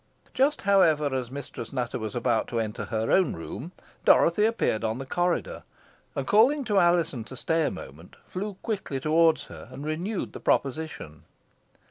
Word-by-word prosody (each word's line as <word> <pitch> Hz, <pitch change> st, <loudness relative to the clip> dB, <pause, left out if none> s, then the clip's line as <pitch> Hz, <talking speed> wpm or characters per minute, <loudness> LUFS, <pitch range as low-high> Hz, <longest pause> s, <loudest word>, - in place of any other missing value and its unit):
Just, 285 Hz, +3 st, +2 dB
however, 165 Hz, -8 st, +4 dB
as 130 Hz, -2 st, -2 dB
Mistress 140 Hz, +1 st, -7 dB
Nutter 125 Hz, -2 st, -2 dB
was 110 Hz, 0 st, -5 dB
about 120 Hz, -2 st, +1 dB
to 120 Hz, -, -2 dB
enter 105 Hz, -1 st, -3 dB
her 110 Hz, +3 st, -1 dB
own 190 Hz, -1 st, +3 dB
room, 125 Hz, -, -7 dB, 0.3 s
Dorothy 190 Hz, +6 st, +5 dB
appeared 220 Hz, -, 0 dB
on 110 Hz, +1 st, -1 dB
the 135 Hz, -, -6 dB
corridor, 175 Hz, +5 st, -1 dB, 0.5 s
and, 135 Hz, -, -2 dB
calling 255 Hz, -, +4 dB
to 210 Hz, -5 st, +2 dB
Alizon 170 Hz, -8 st, +2 dB
to 130 Hz, -, -10 dB
stay 160 Hz, +3 st, +1 dB
a -, -, +1 dB
moment, 80 Hz, +6 st, -10 dB
flew 200 Hz, +2 st, -5 dB
quickly 195 Hz, -, -3 dB
towards 160 Hz, +3 st, +3 dB
her, -, -, -11 dB
and 140 Hz, -, -8 dB
renewed 175 Hz, +7 st, -3 dB
the -, -, -7 dB
proposition. 135 Hz, -, -2 dB
155 Hz, 165 wpm, -27 LUFS, 120-185 Hz, 0.5 s, Dorothy